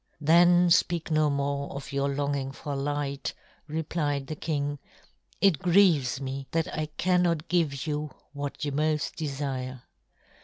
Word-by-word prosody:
"Then 175 +3 +5
speak 170 -2 +2
no 155 -1 +3
more 140 0 -1
of 140 0 -7
your 140 0 +1
longing 140 -1 -1
for 140 +1 -5
light," 140 0 -2 0.3
replied 150 -2 -2
the 155 - -5
king. 145 -2 -2 0.6
"It 190 -8 +4
grieves 170 -9 +4
me 135 0 -5
that 165 -1 0
I 155 0 -2
cannot 175 -3 +2
give 160 -6 +1
you 150 0 -2 0.2
what 145 +1 -4
you 145 - -1
most 150 +1 0
desire. 135 -4 -4
145 Hz, 140 wpm, -28 LUFS, 140-160 Hz, 0.6 s, Then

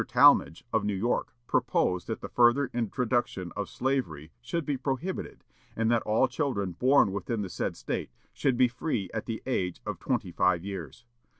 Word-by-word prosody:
Tallmadge 80 - +5
of 110 - +2
New 105 -1 0
York 115 +5 -1
proposed 90 -5 +1
that 110 - -4
the - - -5
further 125 +3 +3
introduction 120 -5 -1
of 105 -1 -3
slavery 85 - -2
should 155 +6 -3
be 145 - 0
prohibited, 135 +8 -4 0.3
and 115 +1 +1
that 115 -1 +3
all 110 +5 +2
children 125 - -1
born 125 +3 +4
within 100 +3 -2
the 95 - -5
said - - -3
State - - -3 0.2
should 135 -4 +1
be 130 0 +6
free 120 - -3
at 110 - -4
the 115 -2 -4
age 90 -9 -1
of - - -4
twenty 90 - -1
five 90 0 +2
years. 95 - -7
115 Hz, 175 wpm, -28 LUFS, 95-130 Hz, 0.3 s, be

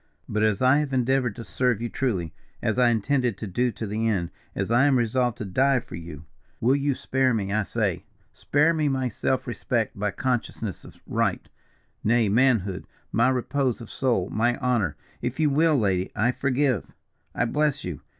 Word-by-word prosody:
But 105 - -1
as 110 +1 +2
I 130 +3 +5
have 145 -3 -2
endeavoured 125 -3 +1
to 115 - -7
serve 120 +4 0
you 120 - -2
truly, 95 - -2 0.3
as 120 +1 0
I 125 -1 +5
intend 120 +4 +1 0.2
to 110 - -5
do 120 +6 0
to 110 - -5
the 110 +2 -1
end 90 -6 0 0.2
as - - -2
I 120 +4 +5
am 135 -2 +4
resolved 120 0 +1
to 110 - -5
die 130 +8 +2
for - - -13
you 80 -3 -8 0.3
will 125 +4 +3
you 140 -1 0
spare 130 -2 +1
me, 100 -2 -2
I 110 - +2
say? 105 - -1 0.3
Spare 150 +4 +2
me 155 -2 +1
my 130 -2 0
self 130 +4 -1
respect, 120 -2 -2
my 105 +1 -1
consciousness 115 -2 -3
of - - -14
right, - - -1 0.6
nay 115 -1 +3
manhood, 110 -5 +2 0.2
my 120 +3 +3
repose 130 0 0
of 115 - -10
soul, 120 -9 0
my 120 +3 +1
honour. 120 -10 0 0.3
If 125 +5 -3
you 150 -2 +3
will, 155 +1 +3
lady, 95 -5 0
I 110 +4 +2
forgive, 130 - 0 0.5
I - - +1
bless 145 +3 0
you. 90 -5 -5
120 Hz, 190 wpm, -25 LUFS, 105-130 Hz, 0.6 s, I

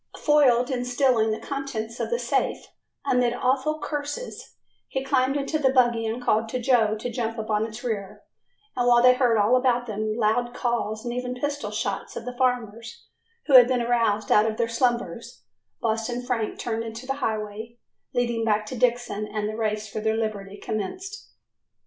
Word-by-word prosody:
Foiled 265 -4 +4
in 250 -1 -1
stealing 245 -3 +2
the 215 - -1
contents 245 -5 -5
of - - -2
the 475 - +1
safe, - - -1 0.4
amid 250 -3 +2
awful 265 +5 +1
curses, 295 +11 -5 0.3
he 265 - -3
climbed 270 0 +1
into 285 +2 -1
the 265 -3 +3
buggy 240 -3 +3
and 235 +3 -3
called 220 -1 +1
to 255 - -2
Joe 230 -4 +3
to 240 +3 -4
jump 230 -1 -3
upon 215 0 0
its 220 +2 -9
rear, 210 -5 -4 0.5
and 245 -1 +1
while 240 0 +5
they 250 0 +8
heard 250 -3 +2
all 210 +4 +4
around 250 -1 +1
them 215 -1 -2
loud 240 +2 +1
calls 235 -3 -2
and 240 - -2
even 250 0 -3
pistol 285 -4 -3
shots 205 -2 -3
of - - -6
the 250 0 -5
farmers, 235 -3 -2 0.4
who 285 - 0
had 250 -2 +10
been 250 -2 +1
aroused 230 -3 +1
out 210 +1 +5
of 215 - -5
their 235 - +1
slumbers, 240 +1 -2 0.4
Boston 230 +1 -1
Frank 245 -4 -2
turned 225 -1 -2
into 225 +2 -7
the 270 +1 -2
highway 220 +1 -3 0.3
leading 240 -2 0
back 215 -1 +1
to 235 - -6
Dixon 240 -3 0
and 210 0 -3
the 215 - -4
race 215 -1 -2
for 215 - -5
their 220 0 +1
liberty 205 -3 -3
commenced. 370 - -5
240 Hz, 180 wpm, -25 LUFS, 220-255 Hz, 0.5 s, had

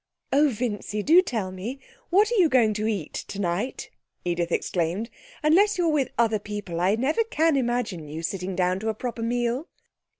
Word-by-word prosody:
'Oh, 290 +2 +5
Vincy, 210 -3 -3
do 335 - +7
tell 220 - -3
me 215 +9 -6 0.3
what 410 +5 +4
are - - +1
you 340 -4 +5
going 235 -5 +4
to 215 +1 -1
eat 200 -9 -3
tonight?' 200 +5 -3 0.3
Edith 175 -1 -1
exclaimed. 180 +8 -1 0.3
'Unless 375 +8 +4
you're 345 -2 +2
with 285 -4 +1
other 225 -2 +2
people 205 -5 -5
I 190 +4 +3
can 225 - -4
never 300 - +2 0.3
imagine 240 - -1
you 155 +3 -6
sitting 185 +2 -3
down 185 0 +1
to 220 +2 -2
a 220 - -1
proper 235 +1 -4
meal.' 240 +5 -1
220 Hz, 175 wpm, -25 LUFS, 185-260 Hz, 0.3 s, do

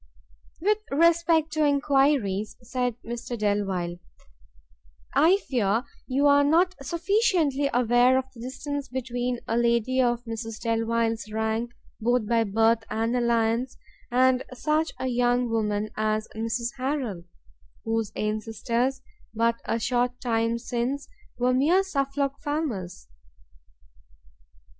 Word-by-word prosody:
"With 420 +5 +2
respect 325 0 +3
to 310 0 +1
enquiries," 275 -8 +2
said 250 -1 -2
Mr 240 +1 -5
Delvile, 195 -5 -1 1.2
"I 340 +6 +5
fear 225 -2 +1 0.2
you 275 +2 +1
are 285 0 +6
not 340 +6 +3
sufficiently 335 - +1
aware 245 +1 +4
of 260 - 0
the 240 - -14
distance 280 +3 -5
between 245 -1 -3
a 225 - 0
lady 235 +2 +2
of 240 -1 +1
Mrs 225 -1 -5
Delvile's 230 -1 -1
rank, 220 +2 -1 0.3
both 240 0 +1
by 230 0 +2
birth 225 +2 +2
and 225 +2 -1
alliance, 235 +1 +1 0.3
and 255 +1 +3
such 305 +5 0
a - - -2
young 245 -1 +1
woman 210 -1 -1
as 215 0 0
Mrs 230 +3 -3
Harrel, 255 - -2 0.6
whose 225 -2 -1
ancestors, 230 +5 -1 0.3
but 230 +1 +1
a 230 - 0
short 245 +1 0
time 230 -1 0
since, 250 +4 -3 0.3
were 250 +1 +2
mere 320 +9 +3
Suffolk 275 -5 -2
farmers. 255 - -3
245 Hz, 115 wpm, -26 LUFS, 225-275 Hz, 1.2 s, are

